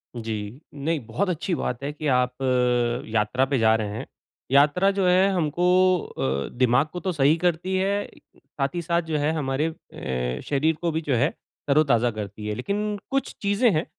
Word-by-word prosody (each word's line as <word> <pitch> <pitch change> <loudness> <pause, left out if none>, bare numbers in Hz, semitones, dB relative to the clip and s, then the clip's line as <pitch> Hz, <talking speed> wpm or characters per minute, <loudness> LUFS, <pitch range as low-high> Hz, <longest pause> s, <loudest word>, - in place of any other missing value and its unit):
जी। 110 +2 -5
नहीं 150 +3 -1
बहुत 175 - -1
अच्छी 175 +1 -2
बात 125 -4 -3
है 140 - -2
कि, 150 0 -4
आप 125 -2 +2 0.8
यात्रा 115 +4 +2
पे 135 0 0
जा 110 0 +4
रहे 110 -2 -1
हैं। - - -5 0.5
यात्रा 145 +8 +4
जो 195 -2 +1
है 185 +2 +4
हमको 170 -1 -1 0.5
अ, 70 +1 -1
दिमाग 125 +3 +3
को 180 - -4
तो 185 +1 -2
सही 150 -2 +3
करती 175 +2 0
है, 200 +2 0 0.3
साथ 140 +1 -4
ही 175 - -1
साथ 170 +1 +1
जो 160 -2 -2
है 150 +2 +1
हमारे 145 0 -1
अ, 65 - -5
शरीर 150 +3 +2
को 170 - 0
भी 160 +1 -1
जो 145 -5 0
है, 140 +6 +3 0.4
तरो-ताज़ा 135 -5 +3
करती 105 -1 -6
है। 105 - -2
लेकिन 205 - -2
कुछ 275 0 -1
चीज़ें 205 +4 +3
हैं, 155 -1 0
150 Hz, 185 wpm, -24 LUFS, 125-175 Hz, 0.8 s, जा